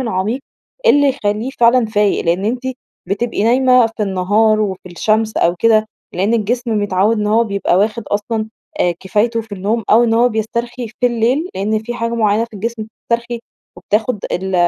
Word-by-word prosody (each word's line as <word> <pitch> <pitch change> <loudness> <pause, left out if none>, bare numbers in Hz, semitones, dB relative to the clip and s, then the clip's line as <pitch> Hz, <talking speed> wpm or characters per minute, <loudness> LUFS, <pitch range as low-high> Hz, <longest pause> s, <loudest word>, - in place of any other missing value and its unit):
العميق، 225 +1 -1 0.5
اللي 285 -9 +5
يخليه 220 -2 -1
فعلًا 235 +1 +5
فايق. 210 -2 +1
لأن 175 +3 0
أنتِ 245 +4 -1 0.5
بتبقي 205 +2 -1
نايمة 250 0 +4
في 225 -1 -5
النهار 205 +3 +2
وفي 190 -3 -2
الشمس 215 +5 0
أو 175 +1 +2
كده، 220 0 +3 0.3
لأن 200 +5 +1
الجسم 230 0 0
متعود 205 +3 +1
إن 210 - -1
هو 225 +3 +3
بيبقى 200 -3 0
واخد 215 +3 0
أصلًا 215 +1 -2 0.3
آآ، 175 -1 +2
كفايته 215 +5 0
في 225 -1 -13
النوم 205 +4 -1
أو 235 +3 +6
إن 225 - +1
هو 240 +2 +4
بيسترخي 235 +2 -3
في 250 - +4
الليل، 245 +8 0
لأن 215 +3 0
في 240 +2 -6
حاجة 230 -1 -2
معينة 220 -1 +2
في 230 -2 -15
الجسم 225 +2 -4
بتسترخي 235 +2 -4 0.4
وبتاخد 215 0 -1
ال 190 +1 -2
220 Hz, 170 wpm, -17 LUFS, 205-235 Hz, 0.5 s, أو